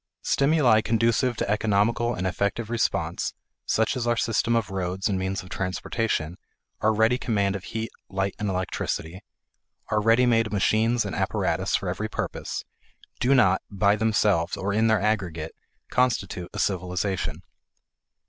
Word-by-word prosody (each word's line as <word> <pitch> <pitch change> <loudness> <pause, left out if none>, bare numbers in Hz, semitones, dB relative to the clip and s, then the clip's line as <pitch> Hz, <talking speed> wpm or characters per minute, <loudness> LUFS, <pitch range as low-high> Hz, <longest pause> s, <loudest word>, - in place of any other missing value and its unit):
Stimuli 140 -6 +4
conducive 115 +2 +1
to - - -1
economical 105 +3 +1
and 95 - -3
effective 100 +4 -1
response, 120 -1 -1 0.3
such 110 +4 +1
as 120 -2 -2
our 120 0 +2
system 115 +1 +1
of 115 -4 0
roads 95 +1 -2
and 95 -3 0
means 95 0 -2
of 90 - -13
transportation, 90 -2 -2 0.4
our 110 - +3
ready 110 +3 +2
command 100 -4 0
of 95 - -6
heat, 110 0 -4 0.2
light, 95 0 -1
and 105 -1 -1
electricity, 90 -1 -3 0.7
our 105 - +1
ready 115 +3 +4
made 115 -3 +2
machines 110 +3 +2
and - - -4
apparatus - - 0
for - - -2
every - - -2
purpose, - - -4 0.6
do 135 +3 +3
not, 95 -8 +4
by 100 0 +2
themselves 105 -5 +1
or 100 +1 -2
in 110 +2 +3
their 110 -1 +3
aggregate, 90 -6 -1 0.4
constitute 115 -8 0
a - - -8
civilization. 95 0 -1
105 Hz, 150 wpm, -25 LUFS, 95-115 Hz, 0.7 s, Stimuli